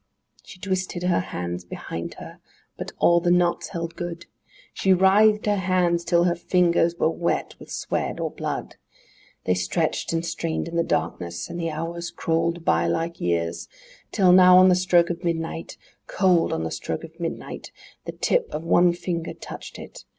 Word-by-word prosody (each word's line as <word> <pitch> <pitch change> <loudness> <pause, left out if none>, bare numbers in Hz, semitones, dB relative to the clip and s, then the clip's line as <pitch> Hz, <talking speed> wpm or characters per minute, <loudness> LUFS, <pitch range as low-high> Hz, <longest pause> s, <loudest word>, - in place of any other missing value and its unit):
IV - - -30
She 185 - -12
twisted 185 -2 -3
her 180 -1 +2
hands 90 - -4
behind 85 -1 -6
her; - - -11 0.4
but - - -6
all 170 0 +4
the 175 0 0
knots 175 0 +2
held 170 -1 -5
good! 170 -1 -6 0.5
She 190 - +3
writhed 210 +3 +4
her 205 -1 +2
hands 180 -2 +1
till 170 0 +3
her 175 -1 +2
fingers 170 -1 +2
were 170 - +1
wet 170 +1 -2
with - - -13
sweat - - -3
or - - -2
blood! - - -5 0.7
They 90 - +3
stretched 90 - -1
and 165 0 -1
strained 165 -1 -3
in 170 - -6
the 170 - +3
darkness, 85 - -3
and 175 - -5
the 165 -1 -1
hours 170 +2 -4
crawled 165 +1 -1
by 85 +1 +2
like 165 - -2
years, 85 -1 -1 0.4
Till, 190 -4 +4
now, 180 0 +8
on 185 0 +7
the - - +5
stroke 175 -2 +3
of 175 +1 -6
midnight, 165 -1 -3 0.3
Cold, 185 -3 +2
on 80 - -2
the 80 - -3
stroke 80 - -4
of 165 +1 -12
midnight, 165 -1 -6 0.3
The - - -5
tip - - 0
of 155 - -4
one 175 +1 +4
finger 170 -1 -4
touched - - -9
it! - - -11
170 Hz, 180 wpm, -24 LUFS, 165-180 Hz, 0.7 s, now